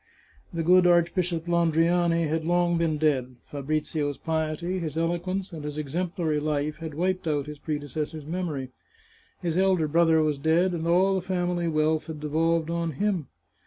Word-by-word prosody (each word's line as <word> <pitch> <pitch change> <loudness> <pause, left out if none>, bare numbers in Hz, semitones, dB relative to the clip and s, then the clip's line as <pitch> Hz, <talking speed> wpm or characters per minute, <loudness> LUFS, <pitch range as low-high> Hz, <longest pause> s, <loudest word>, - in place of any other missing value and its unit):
The 165 -1 -2
good 180 +2 +6
Archbishop 175 -1 +2
Landriani 170 0 +2
had 160 +1 -1
long 175 +1 +2
been 160 -2 +1
dead. 135 -5 0 0.2
Fabrizio's 145 0 -2
piety, 160 +3 -2
his 160 -3 -4
eloquence, 175 +3 -2
and 155 -3 -6
his 150 0 -5
exemplary 160 +1 -1
life, 150 0 -1
had 160 -2 -7
wiped 185 +1 -1
out 145 -3 0
his 150 -1 -8
predecessor's 150 0 -4
memory. 155 -6 -3 0.7
His 170 0 0
elder 190 -4 +3
brother 160 0 +4
was 150 -2 0
dead, 170 +5 +2
and 165 -1 -2
all 185 +3 +4
the 190 - 0
family 180 -1 -1
wealth 155 0 +1
had 160 -2 -6
devolved 160 +2 0
on 170 -1 -1
him. 190 - -1
165 Hz, 160 wpm, -26 LUFS, 155-175 Hz, 0.7 s, good